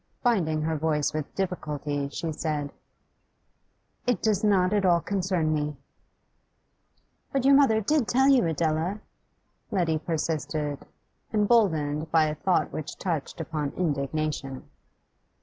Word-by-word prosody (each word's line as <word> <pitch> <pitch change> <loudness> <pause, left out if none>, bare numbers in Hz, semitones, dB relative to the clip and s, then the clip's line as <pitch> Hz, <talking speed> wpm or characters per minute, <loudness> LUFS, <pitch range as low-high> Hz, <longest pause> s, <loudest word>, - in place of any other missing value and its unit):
Binding 165 - +1
her 160 0 -1
voice 150 -2 0
with 155 -2 -4
difficulty, 150 -6 -2
she 160 +3 -4
said: 150 -2 -3 1.4
'It 245 - +2
does 215 -2 +1
not 195 -2 +3
at 205 -1 +2
all 175 -2 +4
concern 180 -4 0
me.' 150 -1 -2 1.5
'But 270 -1 0
your 275 - +7
mother 270 -6 +5
did 280 +2 +1
tell 265 +2 +3
you, 265 -10 +5
Adela?' 160 +5 0 0.7
Letty 170 -5 +1
persisted, 150 -2 -3 0.4
emboldened 165 -9 +2
by 160 -1 +4
a 150 - -1
thought 175 +4 0
which 155 - -5
touched 165 -6 -3
upon 155 -3 -3
indignation. 145 -3 -2
160 Hz, 120 wpm, -27 LUFS, 150-195 Hz, 1.5 s, your